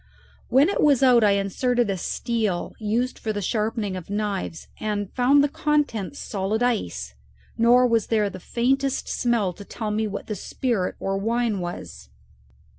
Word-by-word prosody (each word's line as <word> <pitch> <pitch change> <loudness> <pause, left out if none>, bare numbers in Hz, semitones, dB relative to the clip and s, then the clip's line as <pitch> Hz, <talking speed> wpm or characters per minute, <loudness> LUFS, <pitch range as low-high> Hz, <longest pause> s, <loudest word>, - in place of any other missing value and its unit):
When 270 +5 +5
it 400 - 0
was 280 -3 +4
out 245 -3 +6
I 205 -1 +5
inserted 235 +5 +1
a - - -1
steel 210 0 -2
used 230 +4 -1
for 220 - -2
the 205 - -3
sharpening 210 0 -1
of 185 -1 -8
knives 200 -5 -3
and 205 -2 -3
found 270 +3 +4
the - - +3
contents 285 -6 -1
solid 210 +3 -2
ice, 85 - -1 0.4
nor 240 +2 +5
was 230 -3 +2
there 215 -2 +2
the 190 -1 -7
faintest 265 +7 0
smell 230 -7 0
to 200 - -11
tell 215 +1 -4
me 215 +1 0
what 200 0 -5
the 215 - -4
spirit 210 -1 -2
or 195 0 -1
wine 225 0 0
was. 175 - -7
220 Hz, 165 wpm, -24 LUFS, 200-245 Hz, 0.4 s, out